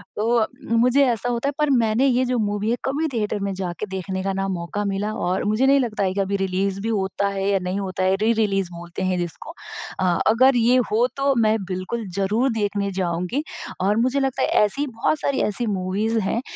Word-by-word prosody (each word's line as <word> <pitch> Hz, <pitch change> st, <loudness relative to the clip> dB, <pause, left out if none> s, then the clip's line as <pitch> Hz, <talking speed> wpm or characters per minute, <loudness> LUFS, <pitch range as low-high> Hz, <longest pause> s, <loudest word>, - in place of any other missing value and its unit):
तो 215 Hz, +2 st, 0 dB
अ, 220 Hz, -, +2 dB, 0.2 s
मुझे 250 Hz, +4 st, +4 dB
ऐसा 240 Hz, 0 st, 0 dB
होता 240 Hz, +2 st, -1 dB
है, -, -, -4 dB
पर 300 Hz, -1 st, +2 dB
मैंने 235 Hz, -1 st, +3 dB
ये 255 Hz, 0 st, +2 dB
जो 250 Hz, 0 st, 0 dB
मूवी 205 Hz, 0 st, -1 dB
है 240 Hz, -, +1 dB
कभी 290 Hz, +4 st, 0 dB
थिएटर 210 Hz, -2 st, -1 dB
में 200 Hz, 0 st, -2 dB
जाके 185 Hz, +1 st, -4 dB
देखने 190 Hz, 0 st, -3 dB
का 195 Hz, 0 st, -1 dB
ना 195 Hz, 0 st, -1 dB
मौका 185 Hz, +2 st, -3 dB
मिला 200 Hz, +2 st, -2 dB
और 185 Hz, -3 st, -1 dB
मुझे 215 Hz, +5 st, +2 dB
नहीं 275 Hz, +1 st, +5 dB
लगता 225 Hz, -6 st, -1 dB
है 185 Hz, -1 st, 0 dB
कि 200 Hz, -, -3 dB
अभी 195 Hz, +1 st, -1 dB
रिलीज़ 195 Hz, +1 st, -1 dB
भी 225 Hz, -, -2 dB
होता 200 Hz, -2 st, 0 dB
है, 195 Hz, 0 st, -2 dB
या 195 Hz, -, +2 dB
नहीं 185 Hz, +2 st, -2 dB
होता 190 Hz, -1 st, -3 dB
है? 190 Hz, +1 st, +3 dB
री-रिलीज़ 210 Hz, -4 st, +1 dB
बोलते 170 Hz, +2 st, -6 dB
हैं 185 Hz, -1 st, 0 dB
जिसको। 175 Hz, -, -5 dB, 0.5 s
अ 180 Hz, -2 st, +2 dB
अगर 255 Hz, +4 st, +5 dB
ये 240 Hz, +1 st, +4 dB, 0.2 s
हो 225 Hz, +3 st, +3 dB
तो 275 Hz, 0 st, +2 dB
मैं 220 Hz, -2 st, +3 dB
बिल्कुल 185 Hz, +5 st, -4 dB
ज़रूर 215 Hz, +7 st, +1 dB
देखने 205 Hz, -2 st, -1 dB
जाऊँगी, 180 Hz, -, -2 dB, 0.4 s
और 205 Hz, +3 st, +2 dB
मुझे 255 Hz, +4 st, +2 dB
लगता 270 Hz, -1 st, 0 dB, 0.2 s
ऐसी, 280 Hz, +8 st, 0 dB
बहुत 255 Hz, +5 st, -1 dB
सारी 280 Hz, -1 st, 0 dB
ऐसी 215 Hz, +3 st, 0 dB
मूवीज़ 205 Hz, +5 st, 0 dB
हैं 220 Hz, +3 st, -1 dB
210 Hz, 215 wpm, -22 LUFS, 190-240 Hz, 0.5 s, नहीं